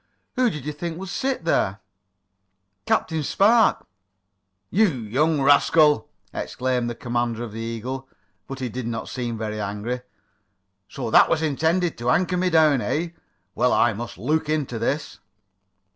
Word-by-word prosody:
Who 250 Hz, -1 st, +3 dB
did 150 Hz, -, -7 dB
you 150 Hz, -, -2 dB
think 165 Hz, +2 st, -5 dB
would 190 Hz, +1 st, -7 dB
sit 255 Hz, +1 st, -2 dB
there?" 100 Hz, -11 st, +1 dB, 1.1 s
"Captain 160 Hz, -1 st, +1 dB
Spark!" 215 Hz, -, +3 dB, 0.9 s
"You 215 Hz, +4 st, +4 dB
young 140 Hz, -, 0 dB
rascal!" 145 Hz, -1 st, +4 dB, 0.2 s
exclaimed 125 Hz, -2 st, -2 dB
the 120 Hz, -, -5 dB
commander 120 Hz, -1 st, -2 dB
of 115 Hz, -, -6 dB
the 110 Hz, -, -7 dB
Eagle, 125 Hz, +4 st, -5 dB, 0.4 s
but 135 Hz, -, -6 dB
he 130 Hz, -, -1 dB
did 125 Hz, 0 st, -5 dB
not 115 Hz, -1 st, -4 dB
seem 120 Hz, -3 st, -4 dB
very 110 Hz, -1 st, -4 dB
angry. 105 Hz, +5 st, -3 dB, 0.9 s
"So 110 Hz, -, -5 dB
that -, -, +6 dB
was 160 Hz, -1 st, +1 dB
intended 160 Hz, +3 st, 0 dB
to 120 Hz, +1 st, -1 dB
anchor 180 Hz, +6 st, +2 dB
me 180 Hz, +1 st, +1 dB
down, 155 Hz, -5 st, +4 dB
eh? 165 Hz, +6 st, -1 dB, 0.4 s
Well, 125 Hz, -, +2 dB
I 120 Hz, -, +3 dB
must 120 Hz, +3 st, -7 dB
look 150 Hz, -, -1 dB
into 145 Hz, -7 st, -1 dB
this." 145 Hz, 0 st, -2 dB
135 Hz, 150 wpm, -23 LUFS, 120-160 Hz, 1.1 s, that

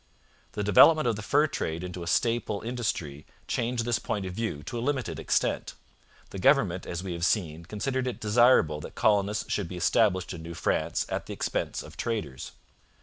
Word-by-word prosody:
The 105 Hz, -, -2 dB
development 140 Hz, -, +6 dB
of 115 Hz, -, +1 dB
the 105 Hz, -, -6 dB
fur 145 Hz, +8 st, +3 dB
trade 85 Hz, -, -3 dB
into 90 Hz, 0 st, -6 dB
a 85 Hz, -, -6 dB
staple 115 Hz, +1 st, 0 dB
industry 95 Hz, -, -3 dB, 0.2 s
changed 120 Hz, 0 st, -1 dB
this 120 Hz, -1 st, +1 dB
point 100 Hz, -4 st, -3 dB
of 90 Hz, -, -5 dB
view 100 Hz, -9 st, -3 dB
to 120 Hz, -, -5 dB
a -, -, -3 dB
limited 130 Hz, -2 st, -2 dB
extent. -, -, 0 dB, 0.6 s
The 100 Hz, -, -6 dB
government, 100 Hz, -, +3 dB
as 90 Hz, +1 st, -4 dB
we 95 Hz, -2 st, -4 dB
have 85 Hz, 0 st, -5 dB
seen, 85 Hz, -4 st, 0 dB
considered 130 Hz, +7 st, -2 dB
it 125 Hz, -, -4 dB
desirable 105 Hz, -, +4 dB
that -, -, -9 dB
colonists 105 Hz, 0 st, +1 dB
should 100 Hz, -4 st, -1 dB
be 90 Hz, -, -7 dB
established 95 Hz, -1 st, +2 dB
in 85 Hz, -, -8 dB
New 85 Hz, +1 st, -8 dB
France -, -, 0 dB
at -, -, -4 dB
the -, -, -5 dB
expense -, -, -2 dB
of -, -, -13 dB
traders. 80 Hz, -, -4 dB
105 Hz, 190 wpm, -28 LUFS, 85-120 Hz, 0.6 s, development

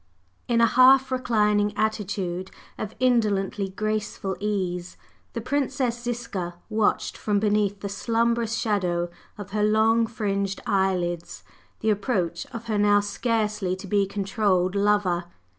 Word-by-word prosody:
In/ 235 Hz, -1 st, +2 dB
a -, -, +7 dB
half 260 Hz, +3 st, +6 dB
reclining 210 Hz, -5 st, +1 dB
attitude 195 Hz, -4 st, -2 dB, 0.3 s
of 215 Hz, -1 st, -6 dB
indolently 210 Hz, -5 st, +1 dB
graceful 210 Hz, -1 st, -3 dB
ease, 185 Hz, -4 st, -2 dB, 0.4 s
the 230 Hz, -, -3 dB
Princess 255 Hz, -2 st, -1 dB
Ziska 230 Hz, -8 st, -4 dB, 0.2 s
watched 215 Hz, -1 st, +1 dB
from 205 Hz, -1 st, 0 dB
beneath 205 Hz, -1 st, +1 dB
the 200 Hz, -, -3 dB
slumbrous 230 Hz, +2 st, 0 dB
shadow 175 Hz, -5 st, 0 dB, 0.3 s
of 205 Hz, -1 st, -8 dB
her 210 Hz, 0 st, 0 dB
long 220 Hz, +2 st, +3 dB
fringed 200 Hz, -3 st, -2 dB
eyelids 180 Hz, -3 st, -1 dB, 0.4 s
the 220 Hz, -, +2 dB
approach 190 Hz, -6 st, -1 dB
of 230 Hz, -1 st, -7 dB
her 215 Hz, -2 st, -1 dB
now 205 Hz, 0 st, +5 dB
scarcely 210 Hz, -2 st, -1 dB
to 190 Hz, +2 st, -10 dB
be 200 Hz, 0 st, +1 dB
controlled 195 Hz, -2 st, 0 dB
lover. 200 Hz, -3 st, +1 dB
210 Hz, 125 wpm, -25 LUFS, 195-225 Hz, 0.4 s, a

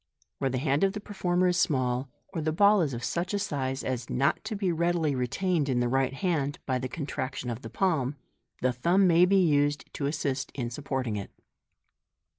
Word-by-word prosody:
Where 135 Hz, -, +1 dB
the 130 Hz, -, -1 dB
hand 140 Hz, +3 st, +1 dB
of 195 Hz, 0 st, +3 dB
the 210 Hz, -, -4 dB
performer 180 Hz, -3 st, 0 dB
is 175 Hz, -, +1 dB
small, 130 Hz, -4 st, +1 dB, 0.2 s
or 170 Hz, -4 st, -4 dB
the 155 Hz, +1 st, 0 dB
ball 200 Hz, +4 st, +5 dB
is 140 Hz, -6 st, 0 dB
of 120 Hz, -, -6 dB
such 175 Hz, +9 st, -1 dB
a -, -, +2 dB
size 135 Hz, -8 st, -2 dB
as 125 Hz, -2 st, -3 dB
not 140 Hz, +3 st, +1 dB
to 215 Hz, 0 st, -3 dB
be 195 Hz, -3 st, 0 dB
readily 170 Hz, -2 st, +1 dB
retained 145 Hz, +5 st, 0 dB
in 125 Hz, -2 st, +1 dB
the 120 Hz, -, +1 dB
right 135 Hz, +1 st, +1 dB
hand 145 Hz, -3 st, -1 dB
by 130 Hz, -2 st, 0 dB
the 130 Hz, 0 st, -4 dB
contraction 130 Hz, -4 st, -4 dB
of 115 Hz, +2 st, -5 dB
the -, -, -8 dB
palm, 150 Hz, -8 st, 0 dB, 0.5 s
the 130 Hz, 0 st, +3 dB
thumb 175 Hz, +10 st, +3 dB
may 175 Hz, 0 st, +6 dB
be 195 Hz, +2 st, +3 dB
used 145 Hz, -4 st, +2 dB
to 140 Hz, -, -2 dB
assist 140 Hz, -2 st, -2 dB
in 120 Hz, -3 st, -3 dB
supporting 130 Hz, -4 st, -3 dB
it. 100 Hz, -, -5 dB
145 Hz, 205 wpm, -28 LUFS, 130-175 Hz, 0.5 s, may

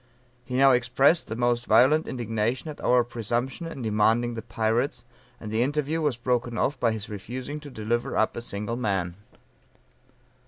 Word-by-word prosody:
He 125 Hz, -, -5 dB
now 135 Hz, +1 st, +6 dB
expressed 130 Hz, +6 st, +3 dB
the 110 Hz, -, -4 dB
most 120 Hz, 0 st, 0 dB
violent 130 Hz, +8 st, +5 dB
indignation 120 Hz, +3 st, -2 dB
at 145 Hz, -, -11 dB
our 125 Hz, -1 st, +4 dB
presumption 120 Hz, -, -3 dB
in 135 Hz, -6 st, -7 dB
demanding 110 Hz, +2 st, +2 dB
the 115 Hz, -, -5 dB
pirates, 115 Hz, +4 st, -1 dB, 0.4 s
and 105 Hz, -, -7 dB
the 110 Hz, +1 st, +1 dB
interview 150 Hz, +4 st, 0 dB
was 145 Hz, -6 st, 0 dB
broken 120 Hz, -1 st, -1 dB
off 135 Hz, +3 st, 0 dB
by 115 Hz, -, +2 dB
his 110 Hz, -2 st, -5 dB
refusing 125 Hz, +8 st, -6 dB
to 150 Hz, -1 st, -10 dB
deliver 120 Hz, +2 st, -2 dB
up 110 Hz, -, +1 dB
a -, -, -4 dB
single 105 Hz, +1 st, -4 dB
man." 95 Hz, -7 st, -1 dB
120 Hz, 165 wpm, -26 LUFS, 110-130 Hz, 0.4 s, now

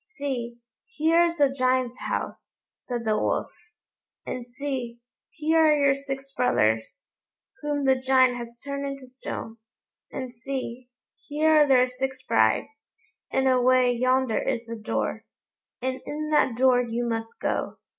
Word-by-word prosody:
"See, 245 Hz, -, -3 dB, 0.3 s
here 335 Hz, -4 st, +3 dB
is 340 Hz, 0 st, -2 dB
the 285 Hz, -3 st, +4 dB
Giant's 255 Hz, -1 st, +1 dB
house," -, -, -5 dB, 0.3 s
said 240 Hz, -2 st, -3 dB
the 215 Hz, -1 st, +2 dB
Wolf; -, -, -1 dB, 0.7 s
"and 245 Hz, -1 st, -5 dB
see, 250 Hz, -2 st, -4 dB, 0.3 s
here 315 Hz, +1 st, +1 dB
are 305 Hz, -1 st, +5 dB
your 280 Hz, -1 st, +4 dB
six 275 Hz, 0 st, -6 dB
brothers, 110 Hz, -, 0 dB, 0.5 s
whom 290 Hz, -1 st, -1 dB
the 265 Hz, -1 st, +4 dB
Giant 260 Hz, -1 st, +4 dB
has 235 Hz, 0 st, -8 dB
turned 280 Hz, 0 st, -3 dB
into 275 Hz, -1 st, -5 dB
stone; 250 Hz, -3 st, -7 dB, 0.5 s
and 255 Hz, -2 st, -5 dB
see, 250 Hz, 0 st, -5 dB, 0.3 s
here 305 Hz, +2 st, 0 dB
are 305 Hz, -2 st, +6 dB
their 255 Hz, -2 st, +5 dB
six 260 Hz, +1 st, -4 dB
brides, -, -, +2 dB, 0.6 s
and 265 Hz, 0 st, +2 dB
away 255 Hz, -1 st, +4 dB
yonder 255 Hz, -1 st, +2 dB
is 235 Hz, -, -2 dB
the 230 Hz, 0 st, -6 dB
door, 215 Hz, -1 st, -2 dB, 0.6 s
and 260 Hz, 0 st, -2 dB
in 305 Hz, +1 st, -4 dB
that 265 Hz, -6 st, +3 dB
door 255 Hz, -1 st, +5 dB
you 240 Hz, 0 st, -2 dB
must 225 Hz, 0 st, -4 dB
go." -, -, -2 dB
260 Hz, 145 wpm, -26 LUFS, 240-280 Hz, 0.7 s, are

